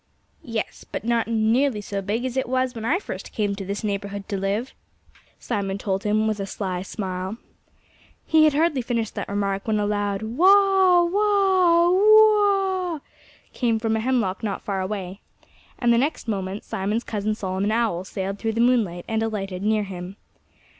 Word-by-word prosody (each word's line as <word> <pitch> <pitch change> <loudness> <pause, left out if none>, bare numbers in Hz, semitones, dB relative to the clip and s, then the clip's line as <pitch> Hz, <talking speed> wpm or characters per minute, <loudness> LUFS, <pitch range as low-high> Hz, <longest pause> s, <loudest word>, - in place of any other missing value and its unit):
"Yes 230 -2 -5
but - - -6
not 235 -1 +1
nearly 230 +2 +2
so 200 -1 -4
big 215 +6 -2
as 255 -1 -3
it 260 -2 -1
was 255 -1 0
when 225 - -7
I 300 +9 +2
first 400 - -7
came 205 -2 -1
to 195 - -6
this 200 +3 -4
neighborhood 200 -1 -4
to 205 - -2
live," 200 +6 -2 0.6
Simon 195 -1 -3
told 195 -1 -2
him 215 +1 +1
with 215 -1 -1
a 195 - -3
sly 185 -2 -3
smile. 190 0 -5 0.9
He 315 -1 +5
had 300 -2 +3
hardly 305 -3 +2
finished 230 -2 -2
that - - -5
remark 200 0 -2
when 215 -1 +1
a 205 - 0
loud 205 -1 -1
wha 375 - +5
wha, 375 -3 +3
whoo 430 +3 +6 0.6
ah - - -8 0.5
came 235 -3 +1
from 220 0 0
a - - 0
hemlock 230 -5 0
not 205 -4 -3
far 195 -2 -2
away. 190 -1 -5 0.6
And 240 -1 +3
the 235 - +3
next 280 -1 -2
moment 195 -1 -3
Simon's 210 +5 -2
cousin 215 0 -2
Solomon 195 0 -2
Owl 220 -6 0
sailed 195 +1 -5
through 225 -1 -1
the 230 - -3
moonlight 225 -8 +2
and 220 0 -1
alighted 195 -4 -3
near 215 +1 +1
him. 185 -1 -7
215 Hz, 175 wpm, -23 LUFS, 195-255 Hz, 0.9 s, whoo